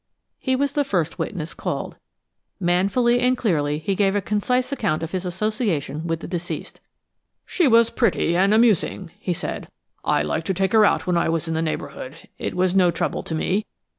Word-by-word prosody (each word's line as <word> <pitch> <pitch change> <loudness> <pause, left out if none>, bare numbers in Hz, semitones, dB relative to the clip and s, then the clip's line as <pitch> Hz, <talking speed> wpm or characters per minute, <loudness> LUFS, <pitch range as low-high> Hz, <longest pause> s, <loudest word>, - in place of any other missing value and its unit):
He 260 -1 0
was 280 +1 0
the 290 0 +1
first 175 - -1
witness 170 -4 -3
called. - - -4 0.6
Manfully 200 +7 +2
and 250 +1 +2
clearly 150 -10 0
he 160 +6 -2
gave 195 0 +2
a - - +3
concise 230 +7 0
account 200 - -1
of 165 - -4
his 185 -1 -3
association 180 - -2
with 165 0 -2
the - - -6
deceased. 175 -1 -5 0.7
"She 350 -5 +2
was 230 -1 +5
pretty 170 -8 +1
and 195 +3 +3
amusing," 215 -5 +2
he 180 - -1
said. - - -4 0.4
"I 75 - +2
liked 155 - -2
to 190 - 0
take 190 +1 +1
her 220 -1 +6
out - - +2
when 180 -1 +1
I 170 - +1
was 165 0 -1
in 165 - -1
the 160 - 0
neighborhood; 155 -3 -4 0.2
it - - -3
was 180 0 +2
no 185 -2 +5
trouble 170 - -1
to 160 - -4
me. 195 +6 0
185 Hz, 195 wpm, -23 LUFS, 165-220 Hz, 0.7 s, her